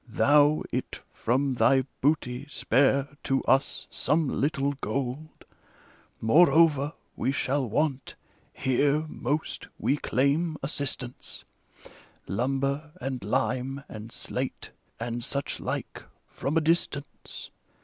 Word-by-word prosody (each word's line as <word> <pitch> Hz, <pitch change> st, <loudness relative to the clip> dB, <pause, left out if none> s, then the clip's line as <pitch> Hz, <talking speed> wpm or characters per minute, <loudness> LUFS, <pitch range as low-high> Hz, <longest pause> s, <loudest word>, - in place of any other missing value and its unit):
Thou 145 Hz, +5 st, +4 dB
It -, -, -3 dB
from 130 Hz, +4 st, +1 dB
thy 130 Hz, +1 st, +4 dB, 0.2 s
booty 140 Hz, -2 st, +1 dB
spare 135 Hz, +2 st, +2 dB
to 135 Hz, 0 st, 0 dB
us 135 Hz, +1 st, +2 dB
some 155 Hz, 0 st, +1 dB
little 140 Hz, +1 st, 0 dB
gold. 135 Hz, +6 st, -4 dB, 0.7 s
Moreover, 150 Hz, +2 st, +5 dB, 0.2 s
we 130 Hz, -, 0 dB
shall 135 Hz, -2 st, 0 dB
want 135 Hz, +1 st, -1 dB, 0.2 s
— -, -, -27 dB
^here, 145 Hz, +4 st, +2 dB
most, 150 Hz, 0 st, -3 dB
we 145 Hz, -, +1 dB
claim 145 Hz, +6 st, +1 dB
assis 140 Hz, -1 st, -1 dB
tance 125 Hz, -1 st, -4 dB, 0.4 s
— -, -, -23 dB
Lumber, 135 Hz, +7 st, -1 dB
and 130 Hz, -, -4 dB
lime, 130 Hz, +4 st, -1 dB
and 110 Hz, +1 st, -9 dB
slate, -, -, -4 dB, 0.3 s
and 120 Hz, +1 st, -3 dB
such 140 Hz, +2 st, -2 dB
like, -, -, -4 dB, 0.3 s
from 145 Hz, +4 st, -1 dB
a -, -, +4 dB
distance. 155 Hz, -3 st, -2 dB
140 Hz, 115 wpm, -27 LUFS, 130-150 Hz, 0.7 s, Moreover